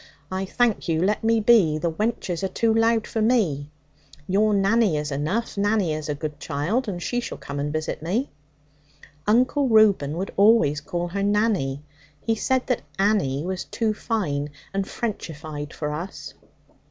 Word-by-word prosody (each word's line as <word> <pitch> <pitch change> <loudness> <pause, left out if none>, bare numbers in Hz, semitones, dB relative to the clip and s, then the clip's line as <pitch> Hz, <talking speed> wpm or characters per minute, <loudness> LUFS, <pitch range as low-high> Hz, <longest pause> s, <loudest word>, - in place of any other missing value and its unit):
I 190 +1 -2
thank 230 +1 +1
you, 160 -1 +1
let 210 +3 +1
me 225 0 +3
be. 205 -9 +4
The 170 +1 -1
wenches 195 -2 -2
are 195 - 0
too 225 +3 +1
loud 225 0 +3
for 225 - -2
me. 190 - +1 0.6
Your 210 +3 +3
Nanny 200 -3 +3
is 150 0 -3
enough. 185 +11 -2
Nanny 205 -5 +2
is 155 0 -4
a 145 - -1
good 150 0 -5
child, 195 - -1
and 185 -4 -3
she 245 +7 -1
shall 245 - -5
come 140 0 -6
and 145 +1 -2
visit 155 0 -3
me.' 205 - -1 1.0
Uncle 255 +6 +3
Reuben 200 -9 +4
would 190 +2 -4
always 200 -8 +4
call 175 +3 -3
her 200 +3 -3
'Nanny'; 200 -10 +1 0.4
he 225 - 0
said 260 +3 0
that 250 - 0 0.2
'Annie' 190 -8 +1
was 185 0 -3
too 220 -2 -1
fine 160 -11 -2 0.2
and 195 0 -1
Frenchified 155 -9 -5
for 150 -1 -4
us. 155 -3 -6
195 Hz, 165 wpm, -24 LUFS, 155-220 Hz, 1.0 s, be